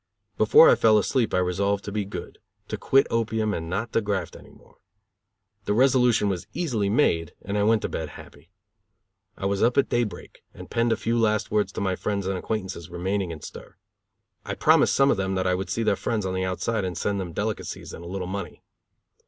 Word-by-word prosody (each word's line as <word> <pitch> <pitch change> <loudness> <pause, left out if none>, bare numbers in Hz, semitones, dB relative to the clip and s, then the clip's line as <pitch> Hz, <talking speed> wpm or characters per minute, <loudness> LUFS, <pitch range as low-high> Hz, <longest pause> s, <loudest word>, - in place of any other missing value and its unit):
Before 110 +9 +7
I - - +7
fell 110 -1 +4
asleep 115 +2 +1
I - - +1
resolved 100 +3 0
to 105 - -5
be 105 -1 -2
good, 100 - -8 0.3
to - - -2
quit 135 0 +3
opium 110 -2 0
and 80 -3 -4
not 110 +6 -3
to 115 - +2
graft 100 -5 -3
any - - -13
more. - - -21 0.9
The 105 - 0
resolution 125 -4 +4
was 95 -3 -3
easily 125 - -1
made 85 - +1
and 100 - -4
I 105 - +1
went 110 +1 +3
to - - 0
bed 80 -2 -4
happy. 70 +4 -15 0.9
I 95 - -5
was 100 0 0
up 120 +3 +2
at 140 - +3
day 120 - +2
break 100 -6 -8
and - - -11
penned 115 0 +1
a 115 - +2
few 115 +1 0
last 110 -2 +1
words 105 -2 +1
to - - -4
my 95 -2 0
friends 100 0 -2
and 95 0 -1
acquaintances 95 -4 -4
remaining 95 +2 -2
in 80 -3 -7
stir. - - -11 0.7
I - - -4
promised - - +4
some 140 0 +4
of - - +1
them 95 0 -1
that 95 0 -1
I 90 - +2
would 95 +1 -3
see 115 +5 -1
their 105 -2 +2
friends 105 0 -2
on 95 - -2
the 95 0 -1
outside 100 +4 -1
and 90 -3 -3
send 100 +2 -1
them 90 -3 -5
delicacies 105 +5 -4
and 85 - -9
a - - -8
little 95 0 -4
money. 100 +2 -6
100 Hz, 220 wpm, -25 LUFS, 95-110 Hz, 0.9 s, Before